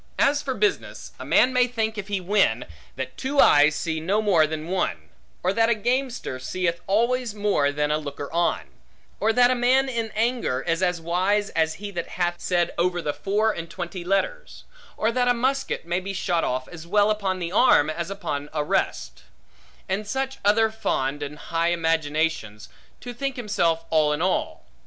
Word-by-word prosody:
As 285 +1 +3
for 265 -2 -3
business, 420 -1 -1
a - - -7
man 255 - +4
may 250 -1 +4
think, 225 -2 -2
if 210 -3 -6
he 200 -2 -1
win, 185 - +1 0.3
that 130 0 -6
two 280 +2 -2
eyes 150 - +6
see 160 -1 -2
no 190 +7 0
more 185 -8 +3
than 155 0 -5
one; 185 +1 -2 0.3
or 185 +2 +2
that 225 +2 +3
a 235 - +3
gamester 245 - -2
seeth 170 +5 -2
always 235 +3 +1
more 205 -9 +1
than 150 +1 -1
a 150 - +1
looker 145 -1 -6
on; 170 0 +1 0.6
or 220 - +2
that 245 +2 +4
a - - +4
man 255 +2 +3
in 230 -3 -2
anger, 225 - 0
is 165 +4 -1
as 180 -2 +1
wise 185 +5 0
as 160 -1 0
he 205 +3 -7
that 170 -3 -4
hath 175 -1 0
said 175 -1 0
over 175 0 +1
the 150 -3 -2
four 210 +6 +1
and 165 -4 -6
twenty 175 0 -6
letters; - - -2 0.3
or 225 - +1
that 245 +1 +1
a 245 - +4
musket 265 -4 -1
may 175 +1 0
be 195 +1 -5
shot 175 -3 0
off 130 +1 -2
as 170 -1 -11
well 205 +3 +3
upon 200 -3 -1
the 175 -2 -4
arm, 190 - +5
as 170 +2 -3
upon 150 -8 -4
a 150 -2 0
rest; 60 - -2 0.6
and 200 +2 -2
such 265 +4 -3
other 220 +2 +3
fond 145 -10 -2
and 145 +1 -5 0.2
high 165 +1 +2
imaginations, 160 -9 -1 0.3
to 245 - -7
think 275 +2 -3
himself 170 -9 0
all 155 -2 +3
in 150 - -2
all. 185 - -1
185 Hz, 190 wpm, -24 LUFS, 160-225 Hz, 0.6 s, eyes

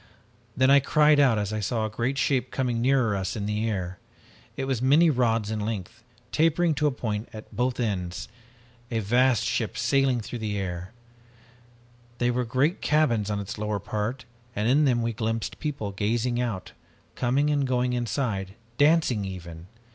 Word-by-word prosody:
Then 130 +1 +4
I 140 - +8
cried 150 +2 +4
out 130 -6 +4
as 105 0 -2
I 110 - -1
saw 110 +2 -1
a - - -2
great 120 +5 -1
shape 130 -3 +1
coming 125 -3 -1
nearer 125 -4 +2
us 95 +1 -2
in 105 -2 -3
the 105 +2 -1
air. 90 -3 -4 0.6
It 135 - -2
was 130 -3 -1
many 150 +6 +5
rods 115 -5 +1
in 110 - -2
length, 105 +1 -4 0.3
tapering 165 +1 +2
to 150 +1 +1
a - - +2
point 110 -4 -4
at 110 0 -10
both 125 +1 0
ends, 90 -7 -2 0.6
a 115 - -2
vast 120 +2 +3
ship 120 -3 -1
sailing 135 -4 +2
in 120 - -4
the 105 -2 -2
air! 90 0 -4 1.3
There 120 0 +1
were 125 0 0
great 135 - +1
cabins 120 -9 +2
on 105 -1 -1
its 100 +1 -6
lower 105 -1 -1
part 110 +5 -3 0.3
and 105 +2 0
in 145 +5 +4
them 120 -3 +2
we 115 0 -1
glimpsed 115 0 -3
people 140 -9 -3
gazing 115 +5 0
out, 110 -7 -3 0.4
coming 135 +5 +1
and 145 -2 +1
going 125 -1 +1
inside, 110 -5 -2 0.2
dancing 145 -8 +3
even! 85 -3 -8
120 Hz, 175 wpm, -26 LUFS, 105-130 Hz, 1.3 s, I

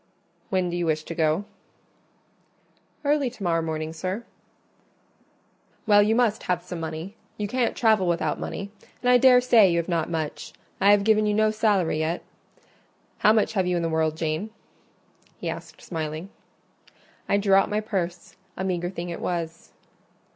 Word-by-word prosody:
"When 185 -2 0
do - - -3
you 175 -1 -1
wish 155 -1 0
to 165 - -6
go?" 160 +4 +1 1.6
"Early 285 -2 +2
to 230 -4 -11
morrow 165 -2 +1
morning, 160 0 -3
sir." 185 +7 -4 1.6
"Well, 205 -1 +6
you 215 +2 +3
must 230 -3 +2
have 175 -1 +1
some 175 -1 -6
money; 160 +5 -6 0.2
you 210 - -2
can't 245 +2 0
travel 215 -5 +3
without 165 -3 0
money, 200 0 -5 0.3
and 250 - +4
I 250 - +6
daresay 250 -5 +6
you 170 - +1
have 170 - -1
not 170 -2 -1
much: 160 -3 -4 0.3
I 195 - +4
have 205 0 +5
given 215 0 +3
you 210 - +1
no 215 0 +3
salary 205 -7 +1
yet. 160 +2 -2 1.0
How 210 - +5
much 220 -1 +2
have 190 -4 +1
you 180 - +1
in 170 - -1
the 165 - 0
world, 160 -1 0
Jane?" 160 +6 -2 0.9
he - - -6
asked, - - -7
smiling. 160 +1 -5 1.0
I 200 - +4
drew 200 -1 +2
out 195 0 +5
my 210 - 0
purse; 185 -5 -4 0.2
a 190 - -3
meagre 175 -2 -1
thing 175 -1 -6
it 170 - -6
was. 165 -2 -4
185 Hz, 170 wpm, -25 LUFS, 165-210 Hz, 1.6 s, Well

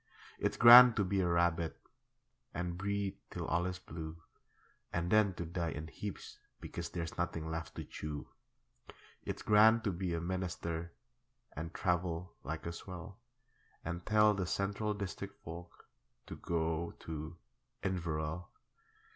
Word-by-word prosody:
It's - - 0
grand 120 0 +11
to 105 - +2
be 95 +1 +1
a 90 - +1
rabbit 85 -2 +1 0.8
And 90 0 -2
breed 100 +1 -2
till - - -4
all 85 +3 +1
is 90 0 -3
blue, 80 -2 -7 0.7
And 85 +1 -1
then 105 -4 +4
to 85 - -4
die 85 0 -2
in 80 +1 -5
heaps 100 +2 -7 0.2
because - - -5
There's 85 0 -5
nothing 80 -2 -2
left 80 0 -5
to - - -4
chew. 75 -1 -6 1.0
It's - - -4
grand 110 +2 +6
to 100 - +1
be 90 -1 -2
a - - -1
Minister 85 -1 -3 0.6
And 80 +2 -5
travel 90 0 -1
like 80 +4 -5
a 85 - -3
swell, 90 +4 -8 0.7
And 85 +2 -3
tell 105 +1 +5
the 95 -3 -2
Central 100 +3 -1
District 100 0 -5
folk 85 +2 -10 0.4
To - - -7
go 85 0 -1
to 80 +1 -6 0.5
Inverell. 85 -2 -2
85 Hz, 140 wpm, -34 LUFS, 80-100 Hz, 1.0 s, grand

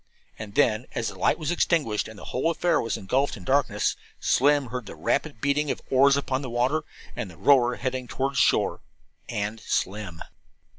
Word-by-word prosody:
And 105 -2 -8
then, 110 +2 +2
as 115 -2 -1
the 95 - -11
light - - +2
was 155 -1 -2
extinguished, 150 -11 +1
and 110 - -11
the - - -11
whole 130 +6 +1
affair 170 0 +1
was 115 - -2
engulfed 130 +8 0
in 95 - -11
darkness, 140 +8 +1 0.2
Slim 140 -1 +3
heard 125 -3 -5
the - - -8
rapid 110 - -1
beating 140 +1 +1
of - - 0
the - - -6
oars 140 +1 +6
upon 135 -1 -1
the 130 - -5
water, 125 +6 +1 0.3
and - - -4
the 85 - -14
rower 125 - +4
heading 130 -1 -3
toward 135 +2 -2
shore 130 - +2 0.5
and 105 +2 -3
Slim. 95 -5 -3
125 Hz, 190 wpm, -26 LUFS, 110-140 Hz, 0.5 s, oars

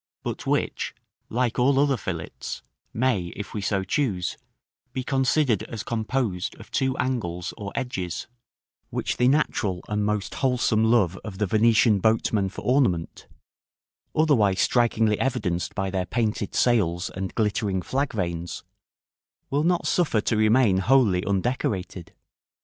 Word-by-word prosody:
but - - -5
which, - - -1 0.3
like 120 0 0
all 135 +2 +4
other 140 -1 +3
fillets, 85 -8 -5 0.3
may, 115 -7 +1
if 105 - -7
we 105 - -3
so 95 0 0
choose, 95 - -1 0.6
be 130 - -3
considered 135 -3 +2
as 110 -2 -6
composed 110 -4 -2
of - - -14
two 130 -1 0
angles 90 -9 -2
or 100 -3 -6
edges, 95 -9 -3 0.6
which - - -2
the 125 - +3
natural 110 -10 +1
and 105 0 -1
most 105 -1 -1
wholesome 125 -4 +2
love 105 -6 +3
of 105 -4 -7
the 105 - +1
Venetian 110 +1 +4
boatmen 110 -1 +2
for 95 - -9
ornament, 120 -11 +1 0.9
otherwise 115 -12 +3
strikingly 115 -3 +2
evidenced 90 -9 -1
by 95 -2 -1
their 90 -1 -1
painted 110 -3 -1
sails 90 -8 +2
and 95 0 -5
glittering 105 -3 0
flag 140 +2 -1
vanes, 85 -4 -3 0.9
will 145 +2 +1
not 175 +1 +1
suffer 165 -11 +2
to 110 - 0
remain 110 -1 +4
wholly 110 -4 +3
undecorated. 100 -4 -2
110 Hz, 135 wpm, -25 LUFS, 95-125 Hz, 0.9 s, all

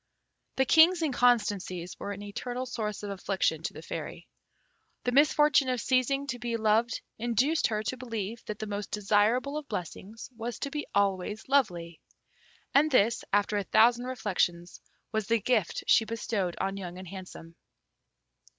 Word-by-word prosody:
The 265 - +2
King's 330 +5 +6
inconstancies 210 - +1
were 205 - -5
an 205 0 -7
eternal 245 +5 -5
source 215 -5 -4
of 205 - -4
affliction 195 0 -1
to - - -4
the - - -10
Fairy. - - -7 0.8
The 245 - 0
misfortune 290 0 +4
of 250 -1 0
ceasing 260 +3 +1
to 245 -3 -4
be 235 -1 -2
loved 220 +2 +2 0.2
induced 240 +7 +2
her 215 -1 -2
to 255 +4 -3
believe 230 -3 -5
that 215 - -5
the 215 - -5
most 205 -1 -4
desirable 215 +8 +1
of 295 - -13
blessings 205 +3 -7
was 230 0 -5
to 280 - -3
be 295 0 -4
always 200 +1 0
lovely. 175 - 0 0.7
And 295 +3 +5
this, 235 -4 +3
after 205 +1 +2
a 205 - 0
thousand 235 +5 +4
reflections, 180 -8 -2 0.3
was 220 -2 -2
the 230 0 +2
gift 215 -4 0
she - - +5
bestowed 215 -5 -2
on 195 0 -2
Young 180 -2 -7
and 185 0 -9
Handsome. 180 -3 -10
220 Hz, 160 wpm, -29 LUFS, 200-255 Hz, 0.8 s, King's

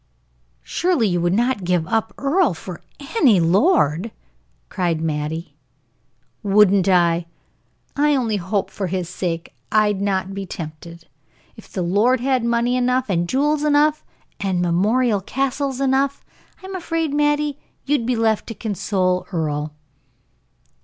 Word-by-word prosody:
"Surely 340 - +1
you 175 -2 0
would 175 0 +1
not 240 -2 0
give 175 -2 +1
up 225 0 0
Earle 280 - +2
for 180 +1 -9 0.4
any 240 - +5
lord!" 180 - +2 0.6
cried 175 -4 -1
Mattie. 160 +1 -3 0.9
"Wouldn't 200 -2 +4
I! 170 -2 +3 0.7
I 295 0 +3
only 230 -5 0
hope 190 +2 -2
for 195 - -3
his 180 -1 -2
sake 170 -2 -4 0.2
I'd 210 -2 +2
not 195 -1 -1
be 195 -1 -5
tempted. 165 +1 -9 0.5
If - - -15
the 185 - -2
lord 210 +9 +2
had 260 0 +1
money 235 +1 +1
enough, 250 -2 +1
and 175 -1 0
jewels 295 +3 +1
enough, 300 +1 +3 0.4
and 190 -3 -1
memorial 205 +6 +2
castles 270 +4 -2
enough 275 +1 0 0.4
I'm 380 +1 -7
afraid, 330 -4 -2
Mattie, 295 -1 +1 0.3
you'd 275 -5 0
be 250 - +1
left 225 -2 +1
to 230 - -6
console 190 -3 -1
Earle." 150 -3 -2
210 Hz, 130 wpm, -21 LUFS, 180-265 Hz, 0.9 s, any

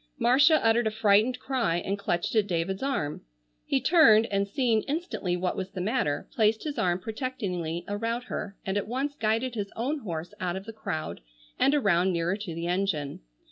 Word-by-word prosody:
Marcia 265 +6 +5
uttered 225 0 +4
a - - +3
frightened 215 +3 +3
cry 250 -10 0
and 195 +3 -2
clutched 175 -3 -1
at 215 -2 +3
David's 185 +2 -1
arm. 255 - -2 0.5
He 135 - +2
turned, 230 - +6
and 200 0 +1
seeing 230 -1 +1
instantly 285 - -2
what 180 0 -1
was 190 0 -4
the 190 - -7
matter, 205 - -1
placed 220 -1 +2
his 295 -2 -4
arm 175 -1 +2
protectingly 185 - -4
about 230 +4 -2
her 200 -5 -5
and 195 +1 -1
at 205 - -2
once 270 +5 -2
guided 230 0 0
his 205 -3 -4
own 275 +7 -1
horse 170 - -5
out 180 -1 -2
of 190 +1 -6
the 225 - -8
crowd, 85 - -4 0.4
and 280 - +4
around 190 -8 +3
nearer 170 +2 0
to 200 -5 -6
the 170 +1 -4
engine. 175 -6 -1
205 Hz, 185 wpm, -27 LUFS, 180-240 Hz, 0.5 s, turned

